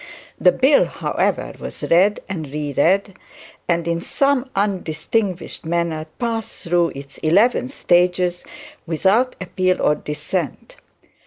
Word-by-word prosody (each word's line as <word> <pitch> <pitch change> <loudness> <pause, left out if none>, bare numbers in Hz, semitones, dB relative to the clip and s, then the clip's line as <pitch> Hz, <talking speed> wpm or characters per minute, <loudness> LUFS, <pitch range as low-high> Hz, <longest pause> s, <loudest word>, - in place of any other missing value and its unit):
The 180 - +6
bill, 270 +7 +4
however, - - -1
was - - -8
read 190 +5 +3
and 160 -7 -5
reread, 150 +7 +1 0.6
and 170 -1 +1
in 170 0 -1
some 275 +2 +1
undistinguished 190 0 -2
manner 165 -1 -1
passed 230 -2 -3
through 170 -2 +1
its 140 0 -10
eleven 205 +11 +3
stages 180 -6 +1 0.4
without 195 +10 +2
appeal 185 0 0
or 150 - +3
dissent. 160 - -4
180 Hz, 110 wpm, -20 LUFS, 165-205 Hz, 0.6 s, The